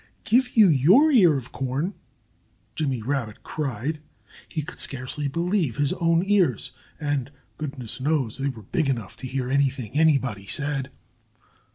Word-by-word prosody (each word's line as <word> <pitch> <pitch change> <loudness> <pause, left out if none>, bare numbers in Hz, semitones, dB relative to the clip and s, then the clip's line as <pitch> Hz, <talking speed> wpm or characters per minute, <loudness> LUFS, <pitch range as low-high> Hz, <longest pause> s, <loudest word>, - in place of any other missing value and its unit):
"Give 250 +2 +2
you 215 -3 +8
your 185 - +5
ear 180 - +6
of 130 -2 -8
corn?" 135 +8 -2 0.8
Jimmy 135 -7 -2
Rabbit 120 -4 -3
cried. 145 +1 -3 0.5
He 155 - -3
could 175 - -10
scarcely 135 +2 -2
believe 170 - 0
his 145 -1 +2
own 165 0 +2
ears 185 - +2 0.3
and 145 -4 -1 0.3
goodness 130 -4 -5
knows 140 -5 0
they 140 +1 0
were 115 -5 -8
big 145 - -1
enough 115 -7 -3
to 130 - -6
hear 130 0 -2
anything 135 -5 0
anybody 135 -10 +2
said. 140 0 -1
140 Hz, 145 wpm, -25 LUFS, 130-160 Hz, 0.8 s, you